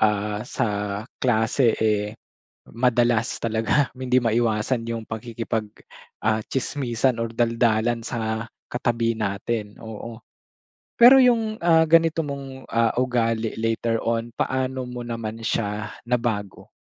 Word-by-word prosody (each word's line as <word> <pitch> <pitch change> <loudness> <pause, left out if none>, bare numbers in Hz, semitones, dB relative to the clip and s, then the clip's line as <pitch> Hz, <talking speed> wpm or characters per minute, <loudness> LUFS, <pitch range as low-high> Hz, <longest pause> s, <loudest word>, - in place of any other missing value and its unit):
ah, 105 0 +1
sa 130 - 0 0.5
klase 115 0 +2
eh, 105 0 0 0.5
madalas 120 -1 +1
talaga, 115 +5 +1
hindi 130 0 +2
maiwasan 115 0 +1
yung 115 -2 -6
pakikipag, 110 -1 -4 0.6
ah, 110 0 +1
tsismisan 130 -2 -1
or 115 0 -3
daldalan 115 0 +1
sa 110 -2 -2 0.2
katabi 115 -1 0
natin, 105 +1 -3
oo. 110 +1 -8 0.8
Pero 260 +3 +9
yung, 230 -3 +3
ah, 165 -1 +5
ganito 165 -1 +3
mong, 135 -2 -7
ah, 115 0 +1
ugali 115 -3 0
later 115 0 -1
on, 115 0 -2
paano 130 0 -1
mo 120 -1 -6
naman 115 -1 -4
siya 105 -1 -1 0.2
nabago? 115 -5 -2
115 Hz, 115 wpm, -24 LUFS, 110-125 Hz, 0.8 s, Pero